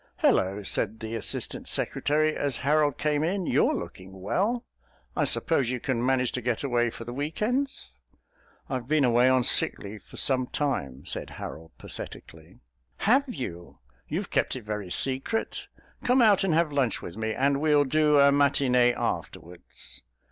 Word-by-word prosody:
"Hullo," 100 Hz, +2 st, +2 dB
said 110 Hz, +3 st, -1 dB
the 110 Hz, 0 st, -6 dB
Assistant 115 Hz, -, -3 dB
Secretary 155 Hz, +1 st, +1 dB
as 140 Hz, -4 st, -1 dB
Harold 150 Hz, -1 st, +2 dB
came 150 Hz, 0 st, 0 dB
in, 185 Hz, +3 st, -1 dB
"you're -, -, +2 dB
looking 95 Hz, +1 st, -8 dB
well. 205 Hz, -, -1 dB, 0.5 s
I -, -, +2 dB
suppose 140 Hz, -7 st, +1 dB
you 125 Hz, 0 st, -2 dB
can 120 Hz, -1 st, -1 dB
manage 130 Hz, -1 st, +2 dB
to 125 Hz, -, -3 dB
get 120 Hz, +1 st, -1 dB
away 120 Hz, -3 st, +1 dB
for 115 Hz, -, -8 dB
the 120 Hz, -, -6 dB
weekends?" 210 Hz, -, -2 dB, 0.8 s
"I've 130 Hz, -2 st, -4 dB
been 155 Hz, 0 st, +2 dB
away 120 Hz, 0 st, +4 dB
on 130 Hz, -1 st, +3 dB
sick -, -, +3 dB
leave 105 Hz, +1 st, -9 dB
for -, -, -13 dB
some 130 Hz, -2 st, +3 dB
time," 70 Hz, -, -3 dB
said -, -, -3 dB
Harold 80 Hz, 0 st, -8 dB
pathetically. -, -, -10 dB, 0.4 s
"Have 265 Hz, +5 st, +3 dB
you? 90 Hz, -, -7 dB, 0.3 s
You've -, -, -4 dB
kept -, -, +1 dB
it 130 Hz, -, -7 dB
very 105 Hz, -3 st, -5 dB
secret. 135 Hz, -, -1 dB, 0.4 s
Come 250 Hz, +2 st, +3 dB
out 205 Hz, -4 st, +5 dB
and 180 Hz, -5 st, +2 dB
have 165 Hz, -2 st, +2 dB
lunch 135 Hz, -5 st, 0 dB
with 85 Hz, -, -7 dB
me, 110 Hz, 0 st, -2 dB
and 140 Hz, +1 st, +1 dB
we'll 150 Hz, -2 st, +4 dB
do 150 Hz, +1 st, +3 dB
a 140 Hz, 0 st, +6 dB
matinée 135 Hz, -3 st, +3 dB
afterwards." 90 Hz, +1 st, -5 dB
130 Hz, 160 wpm, -27 LUFS, 115-150 Hz, 0.8 s, a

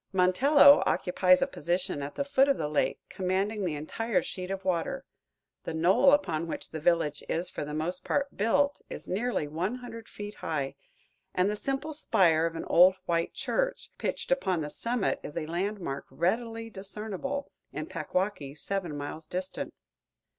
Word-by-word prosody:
Montello 255 Hz, +11 st, +6 dB
occupies 185 Hz, 0 st, +3 dB
a -, -, +3 dB
position 175 Hz, -2 st, -2 dB
at 140 Hz, +1 st, -5 dB
the 280 Hz, -, 0 dB
foot 280 Hz, 0 st, +3 dB
of 275 Hz, -, +3 dB
the 150 Hz, -, -1 dB
lake, 150 Hz, 0 st, +1 dB
commanding 195 Hz, +3 st, -1 dB
the 170 Hz, -5 st, -1 dB
entire 205 Hz, +9 st, -1 dB
sheet 185 Hz, -1 st, -6 dB
of 195 Hz, 0 st, -4 dB
water. 175 Hz, -3 st, -1 dB, 0.6 s
The 160 Hz, -, -4 dB
knoll 185 Hz, -, +5 dB
upon 170 Hz, -, +1 dB
which -, -, -5 dB
the 160 Hz, -, -4 dB
village 160 Hz, -2 st, +1 dB
is 170 Hz, +2 st, -1 dB
for -, -, -4 dB
the 150 Hz, +1 st, -5 dB
most 170 Hz, +4 st, -2 dB
part 280 Hz, 0 st, -1 dB
built 280 Hz, +7 st, +2 dB
is -, -, -7 dB
nearly 210 Hz, -5 st, -1 dB
one 175 Hz, +10 st, -2 dB
hundred 230 Hz, -3 st, -9 dB
feet 205 Hz, 0 st, -7 dB
high, 140 Hz, -4 st, -2 dB, 0.6 s
and 185 Hz, +3 st, +3 dB
the -, -, -2 dB
simple 275 Hz, +7 st, -3 dB
spire 165 Hz, -, +3 dB
of 165 Hz, -, -6 dB
an 165 Hz, -, -4 dB
old 185 Hz, +2 st, +6 dB
white 170 Hz, 0 st, 0 dB
church -, -, -1 dB
pitched -, -, -3 dB
upon 190 Hz, -11 st, +1 dB
the 150 Hz, -1 st, -4 dB
summit 235 Hz, +2 st, 0 dB
is 150 Hz, -, -8 dB
a 160 Hz, -, -1 dB
landmark 175 Hz, -3 st, -3 dB
readily 225 Hz, +5 st, -1 dB
discernible 215 Hz, +8 st, -4 dB, 0.2 s
in -, -, -4 dB
Packwaukee, 180 Hz, -7 st, -2 dB
seven 175 Hz, -3 st, -3 dB
miles 150 Hz, +2 st, -6 dB
distant. 185 Hz, +2 st, -4 dB
185 Hz, 170 wpm, -29 LUFS, 165-225 Hz, 0.6 s, Montello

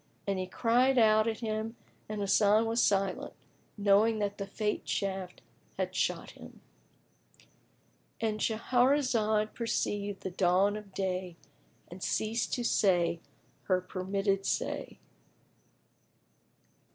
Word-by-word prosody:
And 195 Hz, -1 st, -1 dB
he 185 Hz, -, -3 dB
cried 245 Hz, +6 st, +2 dB
out 215 Hz, -1 st, +5 dB
at 225 Hz, 0 st, -2 dB
him 220 Hz, 0 st, -3 dB, 0.3 s
and 215 Hz, -1 st, -3 dB
Hasan 205 Hz, +2 st, +4 dB
was 230 Hz, +1 st, +1 dB
silent, 195 Hz, -2 st, 0 dB, 0.4 s
knowing 205 Hz, +2 st, +4 dB
that 205 Hz, -1 st, -2 dB
the 200 Hz, -, -4 dB
Fate 210 Hz, +1 st, -3 dB
shaft 190 Hz, -2 st, -3 dB, 0.3 s
had -, -, -2 dB
shot -, -, -1 dB
him.—And 220 Hz, -2 st, -11 dB
Shahrazad 230 Hz, -2 st, +2 dB
perceived 205 Hz, -3 st, -2 dB
the 190 Hz, -, -3 dB
dawn 185 Hz, +3 st, +2 dB
of 210 Hz, -2 st, -10 dB
day 185 Hz, -2 st, -2 dB, 0.5 s
and 175 Hz, +2 st, -11 dB
ceased 225 Hz, +5 st, -1 dB
to 245 Hz, -, -3 dB
say 175 Hz, -7 st, +2 dB, 0.5 s
her 185 Hz, -2 st, +2 dB
permitted 195 Hz, +2 st, -1 dB
say. -, -, -2 dB
205 Hz, 110 wpm, -30 LUFS, 195-225 Hz, 0.5 s, out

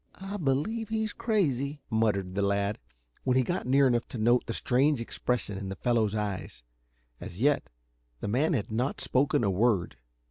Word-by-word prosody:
"I 195 Hz, +2 st, -6 dB
believe 185 Hz, +9 st, -1 dB
he's 220 Hz, -1 st, -1 dB
crazy," 145 Hz, -, 0 dB
muttered 105 Hz, -4 st, +1 dB
the 100 Hz, -, -1 dB
lad, 100 Hz, +1 st, 0 dB, 0.4 s
when 130 Hz, -1 st, +2 dB
he 130 Hz, -, +4 dB
got 175 Hz, +1 st, -2 dB
near 135 Hz, +2 st, +5 dB
enough 120 Hz, -2 st, +2 dB
to -, -, -7 dB
note 120 Hz, +3 st, +3 dB
the 115 Hz, -, -2 dB
strange 135 Hz, +2 st, +2 dB
expression 115 Hz, -3 st, -2 dB
in 100 Hz, -1 st, -5 dB
the 95 Hz, -, -4 dB
fellow's 110 Hz, -2 st, +1 dB
eyes. 100 Hz, -, -4 dB, 0.6 s
As 90 Hz, -, -8 dB
yet, 145 Hz, +3 st, +2 dB, 0.5 s
the -, -, -4 dB
man 135 Hz, +11 st, +2 dB
had 110 Hz, -6 st, -2 dB
not 125 Hz, +5 st, -1 dB
spoken 130 Hz, -2 st, +2 dB
a 100 Hz, -, +2 dB
word. 95 Hz, -, +1 dB
120 Hz, 175 wpm, -29 LUFS, 105-140 Hz, 0.6 s, near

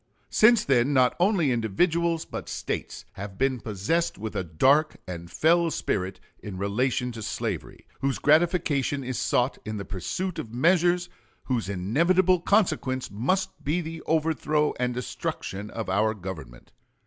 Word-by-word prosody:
Since 230 Hz, +1 st, +5 dB
then 135 Hz, +1 st, +3 dB
not 130 Hz, -2 st, +4 dB
only 175 Hz, -6 st, +3 dB
individuals 165 Hz, -, +1 dB
but -, -, -7 dB
States -, -, -4 dB
have 100 Hz, -1 st, -8 dB
been 130 Hz, -1 st, +1 dB
possessed 110 Hz, -, -1 dB
with 110 Hz, +1 st, -6 dB
a -, -, -1 dB
dark 135 Hz, -, +3 dB
and 85 Hz, -2 st, -7 dB
fell 170 Hz, -, +3 dB
spirit 95 Hz, -, -2 dB, 0.2 s
in 100 Hz, -3 st, -7 dB
relation 125 Hz, +6 st, 0 dB
to 115 Hz, -1 st, -8 dB
slavery, -, -, -4 dB
whose 135 Hz, 0 st, 0 dB
gratification 150 Hz, -3 st, +2 dB
is 130 Hz, 0 st, -3 dB
sought 125 Hz, +2 st, +1 dB
in 110 Hz, 0 st, -4 dB
the 100 Hz, -, -5 dB
pursuit 170 Hz, -, -4 dB
of 115 Hz, +1 st, -7 dB
measures 175 Hz, +4 st, +3 dB, 0.4 s
whose 120 Hz, -7 st, -2 dB
inevitable 170 Hz, -, +2 dB
consequence 155 Hz, -10 st, +1 dB
must 155 Hz, -, -1 dB
be 150 Hz, +5 st, 0 dB
the 165 Hz, -1 st, -6 dB
overthrow 155 Hz, -1 st, +1 dB
and 125 Hz, -1 st, 0 dB
destruction 105 Hz, -4 st, -4 dB
of 110 Hz, -2 st, -5 dB
our 105 Hz, +3 st, +1 dB
Government. 80 Hz, -, -9 dB
130 Hz, 145 wpm, -26 LUFS, 105-165 Hz, 0.4 s, Since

